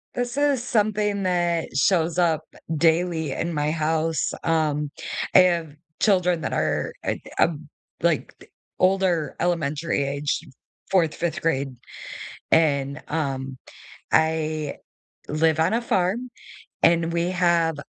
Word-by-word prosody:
This 245 +1 -2
is 285 -4 +2
something 210 -3 +1
that 175 -2 0
shows 165 +3 +2
up, 165 -3 +2
eh, - - -15 0.2
daily 160 -1 +2
in 170 +5 -2
my 150 0 0
house. 160 0 0
Um, 150 -2 +1 0.5
I - - +10
have 170 -4 +3 0.3
children 180 -5 +2
that - - -3
are - - 0
it - - -2 0.2
um, 155 -2 +1 0.3
like, 170 -3 0
the - - -16 0.3
older 185 -4 +2
elementary 165 -3 0
age, 140 +1 -1 0.5
4th, 170 -5 +3
5th 170 -1 -2
grade 140 -5 -1 0.8
and, 140 -3 +2
um, 135 -4 -3 0.5
I 155 -1 +1 0.5
live 160 +1 +2
on 165 +6 +2
a 235 - +1
farm, 230 +3 0 0.5
and 165 0 +3
we 170 +1 0
have 170 -3 +2
165 Hz, 125 wpm, -24 LUFS, 155-180 Hz, 0.8 s, I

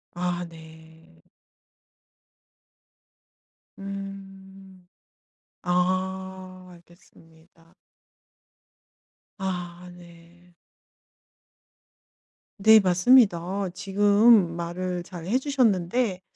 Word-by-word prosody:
아 180 0 -3
네. 160 - -17 2.6
음. 195 -1 -10 0.8
아 185 +1 -3
알겠습니다. 165 -1 -22 1.7
아 180 -2 -5
네. 175 0 -18 2.1
네 220 +2 +7
맞습니다. 190 -1 +3
지금 205 -1 +3
말을 175 +1 -4
잘 175 -2 -10
해 240 +6 +1
주셨는데 230 - 0
185 Hz, 95 characters per minute, -25 LUFS, 175-195 Hz, 2.6 s, 네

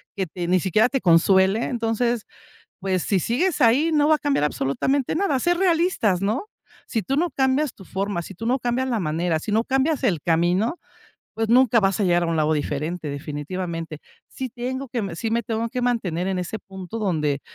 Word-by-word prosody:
que 190 -2 -2
te 175 +1 -5
ni 185 +1 +3
siquiera 210 +6 +3
te 270 -2 -1
consuele, 190 +5 +4
entonces, 235 -1 -1 0.6
pues 185 -2 0
si 195 -3 +1
sigues 295 - 0
ahí 260 +7 +4
no 300 -1 +3
va 310 - +5
a - - -14
cambiar 285 - +1
absolutamente 150 - 0
nada", 335 -7 +1
ser 350 +5 +1
realistas, 335 - +2
¿no?, 220 - -1 0.4
si 225 - -2
tú 270 +9 -2
no 340 +3 +1
cambias 265 +1 +1
tu 190 - -14
forma, 190 -2 -3
si 195 - -10
tú 225 +6 -6
no 255 +3 +2
cambias 250 +1 -1
la 235 -3 0
manera, 165 0 0
si 205 - -4
no 220 +2 +3
cambias 270 +4 +1
el 175 -10 +1
camino, 175 - +1 0.6
pues 225 -1 -1
nunca 245 -1 +5
vas 195 0 +1
a - - +2
llegar 175 -1 +3
a - - -1
un 165 -1 -1
lado 155 0 +2
diferente 150 +3 -3
definitivamente, 155 +3 -5 0.3
si 260 -1 -5
tengo 255 +3 -4
que 210 -8 -3
si 225 +5 -3
me 235 +1 +1
tengo 225 +1 -2
que 250 +1 -3
mantener 190 -8 -1
en 190 -1 -1
ese 180 +5 -4
punto 190 +3 -8
donde, 150 -8 0
215 Hz, 200 wpm, -23 LUFS, 175-255 Hz, 0.6 s, va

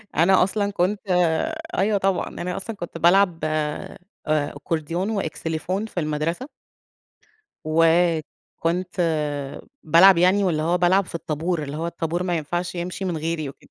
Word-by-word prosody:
أنا 175 +5 +5
أصلًا 200 +2 -1
كنت 200 +2 0 0.8
أيوه 210 +1 +2
طبعًا، 195 -2 0
أنا 180 0 -5
أصلًا 215 +3 -5
كنت 175 -3 -7
بالعب 175 0 +4
آآ 155 -1 -2 0.6
Accordion 165 +5 -2
وXylophone 165 +5 -3
في 185 - -4
المدرسة. 160 - -2 1.2
و 155 +1 +2 0.8
كنت 180 +2 -1 0.8
بالعب 170 +4 +7
يعني، 185 +4 +4
واللي 165 -5 +1
هو 170 +3 +1
بالعب 180 +2 +3
في 175 - -9
الطابور، 165 +1 -2
اللي 145 +1 -5
هو 165 +1 -2
الطابور 170 +1 -2
ما 175 -2 0
ينفعش 175 +4 -3
يمشي 180 +2 -4
من 175 -3 -2
غيري 155 -2 -2
وكده، 135 - -16
175 Hz, 140 wpm, -23 LUFS, 160-185 Hz, 1.2 s, بالعب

